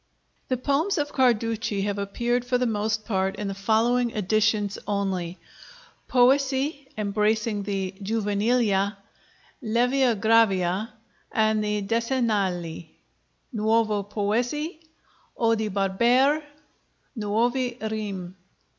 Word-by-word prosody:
The 255 - 0
poems 285 +10 0
of 290 -1 -2
Carducci 225 -5 +1
have 205 0 -2
appeared 240 +5 -1
for 250 0 +1
the 250 - 0
most 215 -1 -1
part 190 -3 0
in 210 - -4
the 195 - -3
following 230 +5 +2
editions 210 0 0
only: 190 -4 -2 0.7
'Poesie,' 270 +2 +2
embracing 210 +1 0
the 195 -2 -3
'Juvenilia,' 205 -1 +1 0.6
'Levia 245 0 +2
Gravia,' 210 -2 +3 0.4
and 215 -1 +2
the 210 -1 -1
'Decennali'; 200 -8 -1 0.6
'Nuove 215 -2 +1
Poesie,' 245 - -1 0.6
'Odi 225 -2 +1
Barbare,' 235 +10 +2 0.7
'Nuove 240 +3 0
Rime.' 195 -4 -5
220 Hz, 95 wpm, -25 LUFS, 200-245 Hz, 0.7 s, Gravia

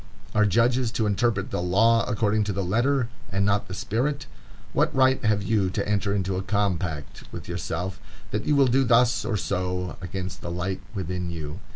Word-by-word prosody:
Are 105 -1 +4
judges 120 +4 +2
to 110 -1 0
interpret 105 -1 0
the - - -1
law 115 +6 +4
according 105 0 +1
to 100 - -1
the 100 +1 -1
letter, 120 +7 +1 0.2
and 100 +1 +1
not 100 0 +1
the 95 - -6
spirit? 130 +7 -1 0.5
What - - +1
right 130 0 +4
have 105 -2 +2
you 100 -1 +1
to 95 - -2
enter 100 -1 +1
into 95 -1 -1
a - - -1
compact 95 -6 -2
with - - -8
yourself 90 +3 -3 0.3
that 105 +1 -2
you 150 - +3
will 140 -1 +5
do 130 +2 +3
thus 120 -1 +4
or 110 -1 -1
so, 90 -1 -2
against 90 +1 -5
the - - -5
light 90 +2 -3
within 90 -1 -3
you? 80 0 -5
100 Hz, 190 wpm, -25 LUFS, 90-115 Hz, 0.5 s, will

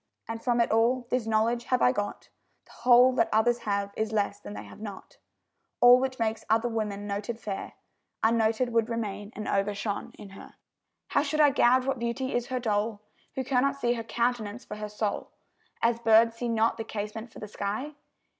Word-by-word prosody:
And 225 0 -5
from 240 -1 +1
it 235 - +2
all, 240 +3 +2
this 245 -3 0
knowledge 225 +2 +1
have 255 - +1
I 125 - +6
got, 205 +8 -4 0.4
The - - -21
whole 250 +1 +5
that 230 -2 +2
others 235 +2 +3
have, 200 0 -1
is 220 0 -2
less 210 -2 -1
than 105 0 -9
they 105 - -7
have 100 - -13
not; 205 -3 -9 0.6
All 245 +1 +8
which 260 0 -2
makes 220 -1 -1
other 225 +2 +3
women 210 -3 -3
noted 205 +3 -4
fair, 200 -4 -5 0.5
Unnoted 225 +2 +2
would 230 0 +2
remain 210 -3 -4
and 215 - -5
overshone 200 +1 -2
in 210 -2 -11
her. 195 - -13 0.5
How 280 - +2
should 305 +1 -2
I 295 -2 +6
gauge 255 -1 +4
what 270 -2 -1
beauty 235 +3 -2
is 245 0 -1
her 255 -1 -2
dole, 210 -2 -1 0.3
Who 265 - -1
cannot 265 +1 +1
see 240 -3 0
her 230 -1 -4
countenance 235 -1 -2
for 210 - -7
her 210 0 -5
soul, 210 0 -3 0.5
As 235 0 +2
birds 230 0 +5
see 240 0 -2
not 225 0 +1
the 225 - -3
casement 220 +2 -6
for - - -14
the 210 - -7
sky? 210 +8 -4
225 Hz, 195 wpm, -28 LUFS, 210-245 Hz, 0.6 s, All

